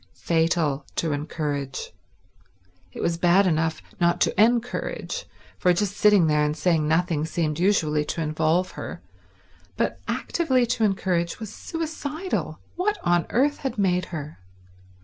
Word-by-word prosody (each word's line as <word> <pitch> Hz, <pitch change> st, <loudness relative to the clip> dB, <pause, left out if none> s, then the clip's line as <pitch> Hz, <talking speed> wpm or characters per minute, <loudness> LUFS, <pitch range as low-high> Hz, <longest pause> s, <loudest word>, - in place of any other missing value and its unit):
Fatal 160 Hz, -4 st, +1 dB
to 165 Hz, -, 0 dB
encourage. 145 Hz, -2 st, -3 dB, 1.0 s
It -, -, -7 dB
was 170 Hz, 0 st, 0 dB
bad 180 Hz, +3 st, +5 dB
enough 160 Hz, -2 st, 0 dB, 0.2 s
not 175 Hz, 0 st, +2 dB
to 205 Hz, -, +3 dB
encourage, 245 Hz, -, -1 dB, 0.3 s
for 180 Hz, -, +4 dB
just 200 Hz, +2 st, -1 dB
sitting 205 Hz, -4 st, +5 dB
there 150 Hz, -1 st, +3 dB
and 150 Hz, +1 st, -1 dB
saying 155 Hz, -1 st, +2 dB
nothing 160 Hz, -1 st, +1 dB
seemed 160 Hz, -1 st, -1 dB
usually 160 Hz, -6 st, +2 dB
to 165 Hz, -, -3 dB
involve 160 Hz, +4 st, +1 dB
her, -, -, -7 dB, 0.7 s
but -, -, -1 dB
actively 260 Hz, -7 st, +1 dB
to 240 Hz, -1 st, -1 dB
encourage 185 Hz, -4 st, 0 dB
was 215 Hz, -2 st, -7 dB
suicidal. 320 Hz, +1 st, -4 dB, 0.2 s
What 415 Hz, +4 st, 0 dB
on 175 Hz, -1 st, +2 dB
earth 285 Hz, +4 st, +2 dB
had 265 Hz, -4 st, -4 dB
made 180 Hz, -3 st, +2 dB
her? 150 Hz, -, -7 dB
175 Hz, 135 wpm, -25 LUFS, 155-215 Hz, 1.0 s, bad